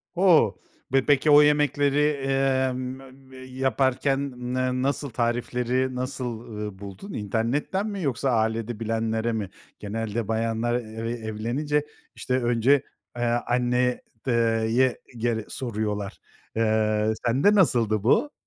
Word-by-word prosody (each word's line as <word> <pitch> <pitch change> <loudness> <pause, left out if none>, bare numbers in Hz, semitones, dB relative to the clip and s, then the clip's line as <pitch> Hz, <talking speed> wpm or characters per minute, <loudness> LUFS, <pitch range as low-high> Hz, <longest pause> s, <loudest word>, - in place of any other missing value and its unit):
O, 170 - +5 0.4
ve 135 -1 +3
peki 145 +1 +4
o 145 - +9
yemekleri, 145 -1 +3 0.3
emm, 130 -1 +1 0.2
mem 135 -1 -14
m 130 - -14
yaparken 130 +1 0 0.3
n 130 0 0
nasıl, 140 0 -1
tarifleri 125 +2 -1
nasıl, 125 -3 -4
ııı, 105 -3 -6
buldun? 100 - -9
İnternetten 120 - -1
mi 200 -2 -4
yoksa 135 0 0
ailede 110 -1 0
bilenlere 115 0 -1
mi? 105 -4 -3 0.3
Genelde 110 +1 -3
bayanlar 115 +1 0
eve 115 -1 -4
evlenince, 120 +7 -2 0.3
işte, 130 0 -1
önce, 120 +4 +3 0.3
eee, 120 - -1
anne 125 +1 +1 0.3
ııı, 115 -2 +2
ye 120 +4 +3 0.3
e - - -12
gere 115 -1 -1
soruyorlar. 105 -5 -3 0.4
Eee, 110 -1 +2
sende 135 - +4
nasıldı 115 - +3
bu? 290 - +3
120 Hz, 125 wpm, -25 LUFS, 110-135 Hz, 0.4 s, o